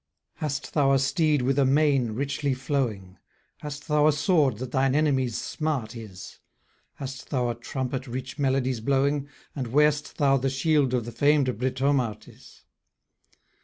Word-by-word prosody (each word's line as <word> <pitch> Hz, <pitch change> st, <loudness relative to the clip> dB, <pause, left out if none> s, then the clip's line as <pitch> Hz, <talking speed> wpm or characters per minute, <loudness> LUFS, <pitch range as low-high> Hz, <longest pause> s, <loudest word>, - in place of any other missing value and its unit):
Hast 145 Hz, -2 st, -4 dB
thou 140 Hz, -3 st, +3 dB
a -, -, +5 dB
steed 140 Hz, +1 st, +1 dB
with 135 Hz, +2 st, +1 dB
a -, -, +5 dB
mane 135 Hz, -4 st, +2 dB
richly 140 Hz, +2 st, -1 dB
flowing? 120 Hz, -9 st, -3 dB, 0.4 s
Hast 145 Hz, 0 st, -7 dB
thou 150 Hz, -1 st, +3 dB
a -, -, +6 dB
sword 145 Hz, -, +2 dB
that 125 Hz, +1 st, -6 dB
thine 135 Hz, 0 st, +2 dB
enemy's 135 Hz, -6 st, +1 dB
smart 140 Hz, -8 st, -3 dB
is? 100 Hz, -5 st, -10 dB, 0.6 s
Hast 135 Hz, -3 st, -8 dB
thou 125 Hz, -3 st, 0 dB
a -, -, -1 dB
trumpet 130 Hz, +2 st, -4 dB
rich 125 Hz, +1 st, -6 dB
melodies 130 Hz, -3 st, +1 dB
blowing? 140 Hz, +3 st, 0 dB, 0.3 s
And 130 Hz, -4 st, -3 dB
wear'st 150 Hz, +4 st, +2 dB
thou 135 Hz, -2 st, +3 dB
the 135 Hz, +1 st, 0 dB
shield 135 Hz, -1 st, +1 dB
of 120 Hz, -3 st, -1 dB
the 120 Hz, -, -6 dB
fam'd 140 Hz, +1 st, +2 dB
Britomartis? 130 Hz, -3 st, -2 dB
135 Hz, 150 wpm, -26 LUFS, 125-145 Hz, 0.6 s, a